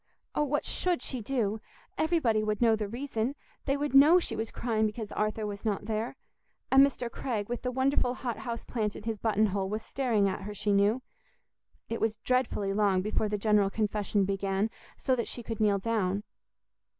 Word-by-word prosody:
Oh, - - +1
what 295 0 0
should 360 -2 0
she 255 -3 -3
do? 220 -3 -1 0.3
Everybody 285 -10 +2
would 215 -1 -1
know 230 -2 +5
the 215 -1 -3
reason; 240 +2 -2 0.3
they 275 0 +1
would 290 -1 -2
know 295 +6 +8
she 360 - -1
was 220 +1 -3
crying 220 -2 0
because 215 0 -6
Arthur 215 +1 -1
was 205 0 -5
not 205 -3 -1
there. 220 +3 -2 0.6
And 270 +1 +8
Mr. 270 -3 0
Craig, 230 -4 -3
with 240 0 -3
the 250 - -1
wonderful 260 -1 +1
hothouse 235 -1 -4
plant 215 -4 -2
in - - -8
his 220 -1 -3
button 220 0 +2
hole, 195 -1 -1
was 215 +1 -3
staring 230 -7 +1
at 190 +1 -2
her, 205 +1 -6
she 205 +1 0
knew. 205 +6 +3 0.8
It 230 - -4
was 220 -1 +1
dreadfully 225 -5 0
long 195 -3 +2
before 215 +1 0
the 210 - -1
General 210 -1 +3
Confession 210 -1 0
began, 195 +2 0 0.3
so 260 - +1
that 235 - -2
she 240 - -6
could 225 -1 -5
kneel 210 -2 +3
down. 200 -2 0
220 Hz, 190 wpm, -29 LUFS, 205-250 Hz, 0.8 s, know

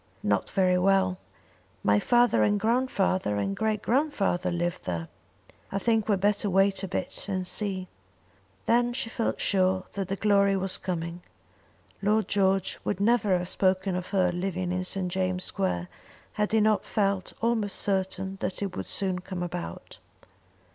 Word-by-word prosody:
"Not 100 -2 +1
very 185 -2 +2
well. 190 -1 +2 0.6
My 105 0 +4
father 240 - +3
and 205 0 +3
grandfather, 205 - +1
and 100 -1 -1
great 215 -1 -1
grandfather 220 - +1
lived 175 0 -2
there. 85 -2 -3 0.6
I 195 - -1
think 225 +1 +1
we - - +5
had 190 - -1
better 205 0 +2
wait 195 +1 +3
a 195 - -3
bit 185 +1 -4
and 185 -2 -1
see." 185 0 -1 0.8
Then 240 +1 +3
she 230 -2 -3
felt 230 - -1
sure 185 -1 +2
that 195 -2 -3
the 195 - -2
glory 200 -1 +3
was 190 0 -2
coming. 170 -1 -4 0.8
Lord 215 +2 +2
George 195 -1 +1
would 200 - -2
never 210 -3 +3
have 175 0 -4
spoken 190 0 +1
of 180 0 -3
her 185 -3 +2
living 180 0 -2
in 185 0 -1
St. 185 -1 -3
James' 185 0 -1
Square 90 -2 -1 0.5
had 210 0 -1
he 220 0 +4
not 215 0 +3
felt 195 -3 -1
almost 225 -3 0
certain 190 -1 -1
that 185 +2 -2
it 195 - -4
would - - -5
soon 190 -2 -1
come 180 -1 -5
about. 85 - -6
190 Hz, 160 wpm, -27 LUFS, 180-205 Hz, 0.8 s, we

